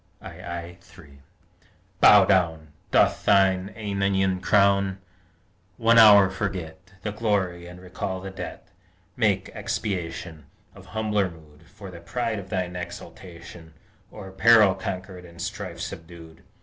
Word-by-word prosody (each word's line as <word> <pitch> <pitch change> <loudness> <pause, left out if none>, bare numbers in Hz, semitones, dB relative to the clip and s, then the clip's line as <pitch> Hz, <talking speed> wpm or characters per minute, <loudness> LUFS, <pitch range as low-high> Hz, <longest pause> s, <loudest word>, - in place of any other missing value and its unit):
II 85 +1 -8
3 75 -7 -17 0.8
Bow - - +7
down! 80 -5 +1 0.2
Doff - - +2
thine 95 0 +3
æonian 95 -3 -1
crown! 100 -1 +2 0.8
One 115 0 +4
hour 100 -4 +8
forget 95 -1 -6
The 105 - -3
glory, 95 -5 -2
and 90 0 -12
recall 95 +1 -5
the 95 +1 -8
debt: 95 - -8 0.5
Make - - 0
expiation, 85 -6 -5 0.3
Of - - -15
humbler 105 -3 -1
mood, 80 -1 -18
For 95 +1 -12
the 85 - -11
pride 115 +5 -3
of 95 -1 -11
thine 90 -1 -3
exultation 85 -1 -10 0.4
O'er 95 -3 -10
peril 110 0 +5
conquered 95 -1 -7
and 85 -1 -15
strife - - -6
subdued. 80 -1 -9
95 Hz, 125 wpm, -24 LUFS, 85-100 Hz, 0.8 s, hour